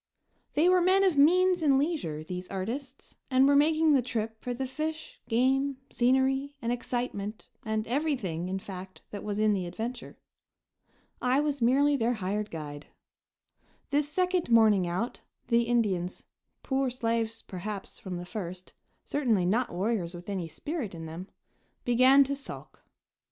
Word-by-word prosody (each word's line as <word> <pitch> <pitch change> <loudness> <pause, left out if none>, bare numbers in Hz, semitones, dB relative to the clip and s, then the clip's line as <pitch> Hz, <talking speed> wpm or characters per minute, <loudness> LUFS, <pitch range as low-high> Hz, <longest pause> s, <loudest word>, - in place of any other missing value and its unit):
They 315 +4 +4
were 365 0 +5
men 375 +2 +4
of 375 -5 +3
means 360 +5 +5
and 280 -4 +4
leisure, 275 - -1
these 180 +2 -6
artists, 250 +8 -6
and 260 0 +5
were 285 - +5
making 310 +1 +4
the 270 - +4
trip 225 -2 -4
for 250 - -4
the 255 +2 -2
fish, 310 +4 -5
game, 265 +3 +2
scenery 265 +3 +2
and 235 -3 -2
excitement 240 -4 -3 0.2
and 220 -1 -1
everything, 235 - -1
in 190 - -1
fact, 190 -1 -9
that 205 - -6
was 205 -1 -3
in 215 0 +3
the 185 -3 -2
adventure. 230 +6 -6 1.0
I 255 +2 +3
was 290 -2 -1
merely 280 +5 +4
their 240 -2 +1
hired 210 +1 -2
guide. 150 -2 -7 1.0
This 290 +1 +1
second 360 0 0
morning 215 -5 +5
out, 185 +8 -3 0.3
the 235 -1 +4
Indians 195 -7 0 0.4
poor 265 -1 0
slaves, 230 -2 -2
perhaps, 195 +2 -6
from 185 -2 -5
the 175 - -6
first, 185 -2 -7 0.3
certainly 235 -11 +1
not 230 +7 +1
warriors 185 -2 -1
with 175 +3 -9
any 185 -4 -3
spirit 255 - -5
in 165 -1 -7
them 165 +4 -7 0.6
began 255 +3 +6
to 280 +1 -2
sulk. 275 - -10
235 Hz, 150 wpm, -29 LUFS, 195-280 Hz, 1.0 s, began